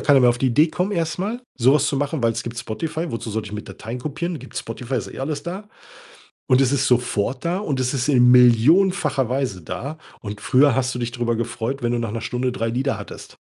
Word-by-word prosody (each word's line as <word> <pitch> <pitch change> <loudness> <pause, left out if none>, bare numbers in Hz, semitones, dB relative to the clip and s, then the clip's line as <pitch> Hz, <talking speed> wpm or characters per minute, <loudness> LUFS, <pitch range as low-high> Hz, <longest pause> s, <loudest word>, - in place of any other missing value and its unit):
keiner 140 -2 +5
mehr 125 -1 +6
auf 120 - -2
die 130 - +1
Idee 150 +7 +4
kommen 180 +5 -2
erst 165 -2 -1
mal 215 +6 -2 0.2
so 130 +3 +5
was 150 0 +3
zu 140 - 0
machen, 145 -1 -2
weil 115 0 +3
es - - -4
gibt 120 0 -6
Spotify. 160 +10 -4
Wozu 115 -1 -5
sollte 110 0 -3
ich - - -9
mir 105 0 -4
Dateien 115 +3 -7
kopieren? 155 +5 -4
Gibt - - -12
Spotify, 125 +3 -5
ist 115 - -3
eh - - -9
alles 145 +2 -3
da. 190 +6 -6 0.8
Und 130 -1 +4
es 135 0 +3
ist 135 -1 +1
sofort 125 +2 0
da. 175 +2 0
Und 145 -10 -2
es 130 +1 0
ist 135 +2 -1
in 125 -2 +6
millionenfacher 135 - +4
Weise 125 -8 -2
da. 140 - -6 0.2
Und 105 -1 -7
früher 135 0 +4
hast 130 0 0
du 125 - -4
dich 120 0 -2
drüber 120 -1 -1
gefreut, 120 +3 -3
wenn 120 0 0
du 120 - 0
nach 115 -3 -3
'ner 115 0 -4
Stunde 125 +3 -1
3 115 -2 -2
Lieder 130 +4 -1
hattest. - - -10
130 Hz, 245 wpm, -22 LUFS, 120-150 Hz, 0.8 s, mehr